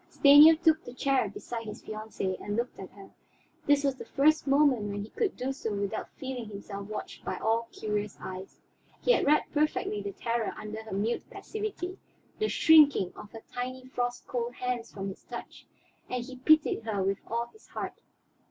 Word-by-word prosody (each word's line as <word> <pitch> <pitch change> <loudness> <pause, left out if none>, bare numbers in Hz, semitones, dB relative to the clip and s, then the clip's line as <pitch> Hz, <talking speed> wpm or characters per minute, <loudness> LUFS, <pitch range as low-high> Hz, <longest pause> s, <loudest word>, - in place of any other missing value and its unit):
Stanief 305 +3 +8
took 320 -1 +4
the 245 - -10
chair 265 -5 +1
beside 230 +3 -6
his 210 - -8
fiancée 215 -3 -4
and 205 - -2
looked 240 +2 -2
at 190 - -7
her; 195 -1 -13 0.6
this 290 0 +4
was 275 -2 +1
the - - -8
first 305 +2 +3
moment 275 -5 +4
when 200 0 -3
he 215 - -11
could 440 -5 -1
do 265 +2 -2
so 225 -5 -4
without 200 +1 -3
feeling 255 -4 -5
himself 200 -1 -7
watched 215 - -7
by - - -3
all 230 +1 +1
curious 210 -1 -3
eyes. 185 +1 -8 0.4
He - - +5
had - - +3
read 300 +1 +5
perfectly 295 -8 0
the 200 0 -4
terror 230 +2 -2
under 215 +1 -6
her 220 - -11
mute 215 +5 -1
passivity, 405 -4 -5 0.4
the 430 - +1
shrinking 290 - +6
of 205 - -11
her 225 - -9
tiny 255 +1 -4
frost 245 -1 -2
cold 245 0 -3
hand 250 -2 -2
from 195 -1 -5
his 190 - -10
touch, - - -9 0.4
and 250 -1 -2
he 260 +1 -9
pitied 310 0 +4
her 215 -4 -1
with 195 +1 0
all 235 +1 -2
his 435 - -20
heart. - - -6
240 Hz, 190 wpm, -29 LUFS, 210-280 Hz, 0.6 s, Stanief